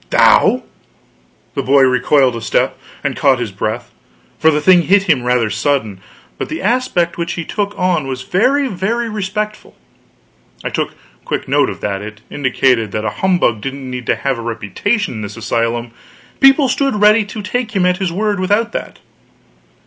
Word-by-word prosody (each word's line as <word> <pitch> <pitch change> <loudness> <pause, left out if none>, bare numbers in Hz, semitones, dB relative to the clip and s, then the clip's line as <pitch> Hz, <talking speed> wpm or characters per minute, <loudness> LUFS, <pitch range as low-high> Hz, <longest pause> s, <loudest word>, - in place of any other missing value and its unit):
"Thou!" - - +4 0.9
The - - -1
boy 135 +1 +4
recoiled 130 0 +3
a 115 - -5
step, 105 -2 0 0.3
and - - -1
caught 130 - +3
his 120 -4 -4
breath, 110 +4 -4 0.5
for 160 - +5
the 150 -1 +2
thing 175 +3 +5
hit 195 +4 +3
him 130 - +2
rather 120 -3 +1
sudden; 110 -3 -1 0.4
but - - -4
the 160 - -4
aspect 200 -7 0
which 170 0 -2
he 170 - -5
took 205 +2 -3
on 180 -6 0
was 130 -1 -4
very, 260 - +2
very 225 +3 -2
respectful. 210 +1 -4 0.9
I - - -2
took - - -3 0.3
quick - - -3
note - - +2
of - - -8
that; 100 -1 -2
it 110 +1 -9
indicated 125 -5 +1
that 110 0 -2
a - - 0
humbug 175 - +2
didn't 135 +1 -5
need 125 -1 -6
to - - +2
have 135 -3 -2
a - - -4
reputation 120 - -2
in 110 - -6
this 100 -1 -7
asylum; 115 0 -1 0.5
people 270 +1 +6
stood 275 -1 0
ready 210 +1 +5
to 205 +1 -7
take 225 +1 -3
him 185 -2 +2
at 180 0 +2
his 185 -3 -2
word, 205 +2 -1
without 205 +5 +1
that. - - -5
160 Hz, 180 wpm, -16 LUFS, -, 0.9 s, people